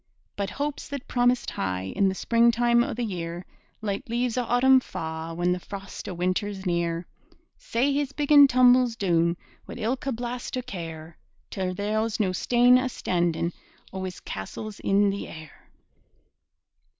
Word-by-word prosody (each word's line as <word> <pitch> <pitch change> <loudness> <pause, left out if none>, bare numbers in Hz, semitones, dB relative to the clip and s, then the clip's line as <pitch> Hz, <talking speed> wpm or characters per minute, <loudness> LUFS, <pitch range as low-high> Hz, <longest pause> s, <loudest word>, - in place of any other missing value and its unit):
But 200 -1 -2
hopes 290 0 -4
that 280 -2 -6
promised 245 0 +1
high 95 0 -3
In 195 -1 +3
the 190 - -3
springtime 235 +2 +3
o' - - -3
the 245 - -2
year, 175 -4 -4 0.4
Like 200 +1 -3
leaves 240 0 0
o' 250 - +1
autumn 260 +3 +5
fa' 160 -7 -5
When 175 +1 +1
the 180 - 0
frost 195 +2 -8
o' - - -4
winter's 190 +3 -2
near. 170 -1 -1 0.5
Sae 260 +5 0
his 285 -1 -1
biggin' 290 -1 +6
tumbles 250 -2 +5
doon, 170 -4 +1 0.3
Wi' - - -7
ilka 250 +4 -2
blast 245 +1 -4
o' 255 - -3
care, 165 -7 -8 0.3
Till 185 -1 -2
there's 215 +3 -1
no 195 -4 +2
stane 245 +6 +4
astandin' 175 -9 -1 0.4
O' 190 0 -4
his 185 -1 -5
castles 200 - -7
in 200 0 +3
the 200 - -5
air. 160 -2 -12
205 Hz, 150 wpm, -26 LUFS, 175-245 Hz, 0.5 s, biggin